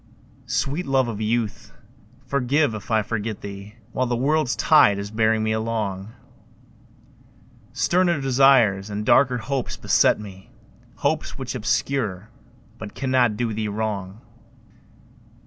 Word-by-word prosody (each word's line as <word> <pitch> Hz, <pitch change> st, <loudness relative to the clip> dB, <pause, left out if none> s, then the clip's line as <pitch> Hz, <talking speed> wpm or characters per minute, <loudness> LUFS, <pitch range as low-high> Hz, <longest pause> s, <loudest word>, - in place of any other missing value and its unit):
Sweet 145 Hz, +5 st, -2 dB
love 135 Hz, -2 st, +2 dB
of 110 Hz, -2 st, -5 dB
youth, 110 Hz, -1 st, -2 dB, 0.5 s
forgive 140 Hz, +1 st, +1 dB
if 110 Hz, -, -8 dB
I 110 Hz, -2 st, +2 dB
forget 110 Hz, -1 st, -4 dB
thee 100 Hz, +1 st, -9 dB, 0.2 s
While 130 Hz, +1 st, -1 dB
the 120 Hz, -, -1 dB
world's 135 Hz, 0 st, +1 dB
tide 120 Hz, -6 st, +5 dB
is 100 Hz, +1 st, -6 dB
bearing 110 Hz, 0 st, +1 dB
me 110 Hz, -, 0 dB
along; 110 Hz, -2 st, -3 dB, 1.6 s
Sterner 175 Hz, -3 st, +1 dB
desires 130 Hz, -7 st, +3 dB
and 105 Hz, +1 st, -4 dB
darker 125 Hz, +1 st, +4 dB
hopes 125 Hz, +3 st, -3 dB
beset -, -, +3 dB
me, 95 Hz, -2 st, -11 dB, 0.5 s
Hopes -, -, -2 dB
which -, -, -5 dB
obscure 105 Hz, -7 st, -2 dB, 0.5 s
but 105 Hz, -2 st, -8 dB
cannot 130 Hz, -5 st, +1 dB
do 115 Hz, -1 st, -1 dB
thee 110 Hz, 0 st, -2 dB
wrong. 105 Hz, -1 st, -4 dB
110 Hz, 125 wpm, -23 LUFS, 105-130 Hz, 1.6 s, tide